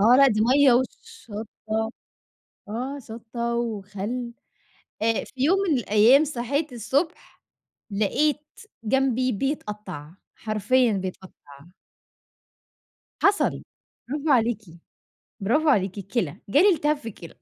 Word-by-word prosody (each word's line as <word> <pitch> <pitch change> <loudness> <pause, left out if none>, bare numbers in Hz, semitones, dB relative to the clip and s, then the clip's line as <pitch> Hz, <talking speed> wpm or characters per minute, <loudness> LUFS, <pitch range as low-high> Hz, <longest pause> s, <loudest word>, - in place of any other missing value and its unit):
آه، 230 +5 +6
لأ 275 +1 +7
دي 215 -2 0
مَيّة 260 +4 +5
وشطّة، 220 - -3 0.8
آه 255 +6 -4
شطّة 235 +1 -4
وخل، 225 +1 -4 0.7
آآ 225 0 +1
في - - -16
يوم 365 +7 +4
من 275 - +3
الأيام 230 +6 +5
صحيت 280 +1 -2
الصبح 265 - -2 0.5
لقيت 270 +9 +1 0.4
جنبي 255 +1 +1
بيتقطّع، 210 - -4 0.2
حرفيًا 220 +3 +1
بيتقطّع. 190 -1 -5 1.9
حصَل، 400 0 +3 0.5
براڨو 295 +3 -2
عليكِ 230 -3 +2 0.8
براڨو 300 +8 +3
عليكِ، 190 -1 -2
الكِلَى 190 - -2
جالي 315 - +5
التهاب 300 -1 +1
في 245 - -10
الكِلَى. 170 -5 -12
235 Hz, 105 wpm, -25 LUFS, 215-275 Hz, 1.9 s, لأ